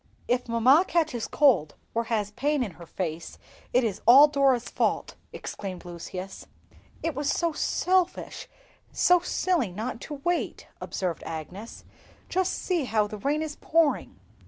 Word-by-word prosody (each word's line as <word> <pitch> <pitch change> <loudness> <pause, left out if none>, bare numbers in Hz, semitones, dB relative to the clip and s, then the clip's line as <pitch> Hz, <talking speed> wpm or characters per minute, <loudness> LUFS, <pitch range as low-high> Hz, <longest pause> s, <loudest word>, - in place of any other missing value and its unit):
"If 245 0 0
mamma 255 +8 +5
catches 310 -9 0
cold 240 - +3 0.2
or 230 0 0
has 210 -3 -1
pain 280 +5 0
in 210 - -5
her 170 0 -13
face 165 -2 -5 0.3
it 250 - +3
is 210 -4 -2
all 270 +5 +10
Dora's 275 -4 +2
fault!" - - -1 0.2
exclaimed 185 -3 -7
Lucius. 180 +2 -7 0.6
"It 330 - -1
was 290 +1 -2
so 335 -2 +1
selfish—so 360 +1 0
silly 345 - 0
not 225 +6 -5
to 300 - -6
wait," 345 +5 -2
observed 180 -3 -3
Agnes; 180 +7 -7 0.5
"just 375 0 0
see 345 -6 -1
how 215 -3 +1
the 210 0 -7
rain 295 +7 0
is 305 -2 -6
pouring!" 325 -2 +1
250 Hz, 140 wpm, -27 LUFS, 205-305 Hz, 0.6 s, all